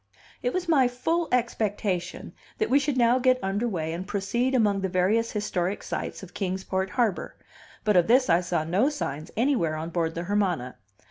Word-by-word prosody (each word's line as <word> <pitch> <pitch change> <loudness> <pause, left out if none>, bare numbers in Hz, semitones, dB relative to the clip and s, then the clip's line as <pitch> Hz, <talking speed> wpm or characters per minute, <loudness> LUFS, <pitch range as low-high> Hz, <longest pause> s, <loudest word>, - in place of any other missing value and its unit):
It 245 - 0
was 365 +3 -2
my 280 -6 +4
full 320 +8 -1
expectation 205 -7 -1 0.2
that 435 - -1
we 280 - +6
should 285 -2 -1
now 240 +1 +4
get 255 0 +4
under 200 +5 0
way 160 -7 -2
and 180 +3 -5
proceed 235 +6 0
among 205 -5 +2
the 190 - -1
various 200 +6 +1
historic 200 -3 -2
sights - - -4
of 190 - -11
Kings 190 -1 -3
Port 190 0 -1
harbor, 220 -4 -1 0.5
but 210 -2 +2
of 175 -2 +5
this 255 +2 +4
I 170 0 +4
saw 175 -3 -1
no 190 - +2
signs 155 - -4
anywhere 230 - +1
on 160 +2 -5
board 165 -1 -1
the 170 - -3
Hermana. 180 -10 -1
200 Hz, 190 wpm, -26 LUFS, 180-245 Hz, 0.5 s, we